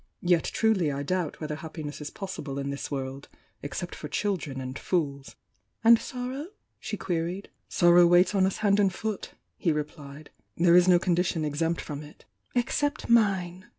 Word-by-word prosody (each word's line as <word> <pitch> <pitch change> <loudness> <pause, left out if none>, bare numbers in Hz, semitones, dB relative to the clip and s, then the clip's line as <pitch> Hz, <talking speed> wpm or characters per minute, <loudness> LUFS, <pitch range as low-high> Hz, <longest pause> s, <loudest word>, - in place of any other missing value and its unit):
Yet 175 -2 +3
truly 200 -9 +1
I 140 0 -3
doubt 180 0 -2
whether 150 -1 -4
happiness 155 -2 -7
is 150 - -5
possible 155 -8 -6
in 140 0 -2
this 140 - -5
world, 135 0 -5 0.3
except 175 +5 -5
for 150 - -7
children 160 -7 -2
and 130 +1 -5
fools." 140 -6 -2 0.5
"And 230 0 +7
sorrow?" 255 +4 -5 0.3
she 210 - -4
queried. 175 +3 -3 0.2
"Sorrow 175 0 +6
waits 175 +2 +5
on 190 -2 +3
us 190 - -3
hand 200 0 +4
and 195 -2 +4
foot," 215 +2 -4 0.2
he 170 - +1
replied 150 -1 -6
— - - -47
"There 170 0 +5
is 180 0 +6
no 180 -1 +7
condition 175 -2 0
exempt 165 +3 -1
from 145 -1 -6
it." 150 +1 -14 0.3
"Except 285 +4 0
mine!" 190 -6 +2
175 Hz, 170 wpm, -27 LUFS, 150-195 Hz, 0.5 s, And